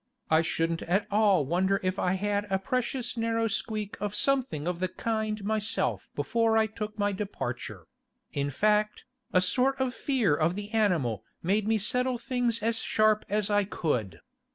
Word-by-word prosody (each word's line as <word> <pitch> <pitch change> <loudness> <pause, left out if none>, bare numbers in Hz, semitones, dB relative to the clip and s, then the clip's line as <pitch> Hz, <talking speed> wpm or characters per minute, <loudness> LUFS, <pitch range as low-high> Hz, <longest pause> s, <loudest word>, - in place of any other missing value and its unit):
I 160 0 +6
shouldn't 165 0 -1
at 195 +5 +1
all 200 -7 +4
wonder 190 +6 +1
if 185 +1 -1
I 180 - +1
had 205 +1 -1
a 190 - +2
precious 250 +3 -2
narrow 230 0 0
squeak 215 -1 -3
of 205 0 -2
something 260 - +1
of 175 -1 -2
the 185 - +1
kind 215 +1 -2
myself 215 +1 0
before 230 -1 +2
I 220 - +4
took 215 0 -6
my 205 -1 +1
departure; 200 +1 -5 0.5
in 140 -1 -1
fact, 210 +7 +1 0.3
a 185 - +4
sort 260 +9 +1
of 260 -1 0
fear 245 - +1
of 165 +3 +1
the 205 +1 -6
animal 165 - +1 0.2
made 200 +4 +1
me 220 0 +3
settle 250 +4 +1
things 235 -2 -1
as 230 0 +1
sharp 215 0 +2
as 210 0 0
I 205 0 +4
could. 125 - -2
210 Hz, 170 wpm, -28 LUFS, 185-225 Hz, 0.5 s, I